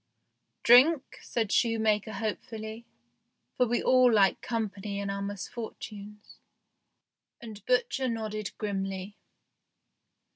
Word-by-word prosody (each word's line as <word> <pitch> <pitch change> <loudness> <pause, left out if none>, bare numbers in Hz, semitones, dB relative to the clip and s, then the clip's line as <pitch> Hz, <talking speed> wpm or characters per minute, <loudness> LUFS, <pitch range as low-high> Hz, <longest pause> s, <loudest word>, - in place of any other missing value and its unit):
" - - -52
Drink? 260 +5 +5
" - - -19
said 225 -4 -2
shoemaker 220 -2 +1
hopefully, 220 +1 -5 0.7
for 250 - +2
we 240 +1 0
all 255 -1 +5
like 200 -4 +3
company 205 -3 -3
in 200 0 -3
our 200 0 -4
misfortunes, 210 0 -8 1.0
and 215 -4 -10
butcher 255 +1 +1
nodded 215 -3 -3
grimly. 195 -1 -4
215 Hz, 105 wpm, -29 LUFS, 200-235 Hz, 1.0 s, Drink